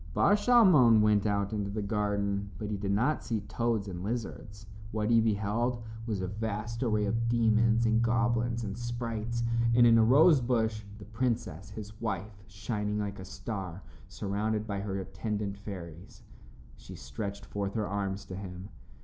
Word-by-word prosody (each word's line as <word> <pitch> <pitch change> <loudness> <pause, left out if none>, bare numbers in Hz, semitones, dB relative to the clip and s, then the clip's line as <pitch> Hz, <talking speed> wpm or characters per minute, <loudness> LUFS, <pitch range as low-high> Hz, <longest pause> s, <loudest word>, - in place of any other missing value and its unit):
Bar 200 - +4
Shalmon 185 - +6
went 105 0 +3
out 100 0 0
into 100 -2 -2
the 105 +1 -3
garden, 100 -1 -1
but 105 -1 -4
he - - -1
did 100 0 -2
not 125 +10 +1
see 110 -3 -2
toads 115 0 -1
and 90 -2 -6
lizards. 105 -1 -5 0.3
What 110 +1 -1
he 115 -1 +6
beheld 110 +3 0 0.2
was 105 -4 -2
a 95 - -2
vast 110 +3 -4
array 110 -4 +1
of 115 +3 0
demons 115 0 +3
and 115 0 +3
goblins 115 0 +1
and 100 -2 -4
sprites, 120 -1 -3 0.3
and 120 0 +7
in 115 -1 +6
a - - +6
rose 140 +5 +6
bush 110 -3 0
the 105 - -11
princess, 110 -6 -2
his 105 0 -9
wife, 100 -2 -4
shining 105 0 -3
like 100 -1 -3
a 95 - -7
star, 95 -2 -6 0.2
surrounded 105 +2 -2
by 100 -2 -3
her 100 -1 -3
attendant 105 +1 -3
fairies. 90 -4 -9 0.5
She - - -11
stretched 100 +10 -6
forth 100 -1 -4
her 110 -2 0
arms 100 0 -3
to 95 - -7
him. 95 0 -7
105 Hz, 165 wpm, -30 LUFS, 100-115 Hz, 0.5 s, and